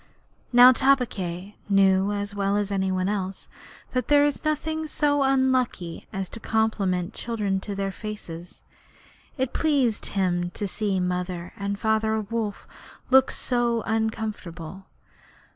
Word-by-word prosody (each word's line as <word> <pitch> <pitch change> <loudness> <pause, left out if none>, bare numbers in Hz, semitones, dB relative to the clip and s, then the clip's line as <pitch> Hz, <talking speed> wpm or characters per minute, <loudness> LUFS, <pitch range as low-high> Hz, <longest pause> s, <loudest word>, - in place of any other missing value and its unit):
Now, 245 +1 +9
Tabaqui 210 -9 0
knew 195 0 +4
as 205 0 -3
well 200 0 0
as 205 -1 -1
any 190 -1 0
one 185 0 0
else 195 -2 -3 0.4
that 255 -1 -1
there 290 0 +5
is 290 -2 -1
nothing 315 +1 -1
so 290 -2 +1
unlucky 260 -10 +1
as 195 -1 -3
to 230 - -8
compliment 200 -6 0
children 210 -5 -2
to 200 +1 -6
their 195 0 -2
faces; 180 -5 -8 0.7
and 260 - +1
it - - -29
pleased 275 -8 +1
him 175 -3 0
to 205 - -2
see 195 0 -1
Mother 180 -1 -3
and 200 0 -3
Father 220 +1 +1
Wolf 215 -1 -3 0.5
look 265 0 +6 0.2
uncomfortable. 220 -7 -2
205 Hz, 130 wpm, -25 LUFS, 190-240 Hz, 0.7 s, Now